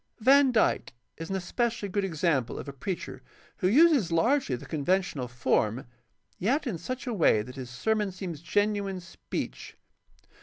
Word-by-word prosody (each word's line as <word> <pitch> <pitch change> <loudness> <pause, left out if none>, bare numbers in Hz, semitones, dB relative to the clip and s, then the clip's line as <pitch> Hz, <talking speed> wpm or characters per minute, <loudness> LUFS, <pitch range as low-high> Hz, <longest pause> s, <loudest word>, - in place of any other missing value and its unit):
Van 270 +3 +6
Dyke 225 -3 +1 0.2
is 165 +1 -7
an 195 - -1
especially 220 +4 -1
good 200 +1 -1
example 155 -8 0
of - - -7
a 140 - -6
preacher 135 -3 -5 0.4
who 185 - +1
uses 275 - +5
largely 230 - +2
the 120 - -9
conventional 155 -3 -1
form, 120 -1 0 0.5
yet 270 - +1
in 205 -10 -3
such 255 - -5
a 245 - -2
way 155 - +3
that 125 +3 -10
his 130 -3 -7
ser 130 - 0
mon 210 -3 -1
seems 180 -5 -6
genuine 205 0 0
speech. 175 -1 -7
185 Hz, 160 wpm, -28 LUFS, 145-220 Hz, 0.5 s, Van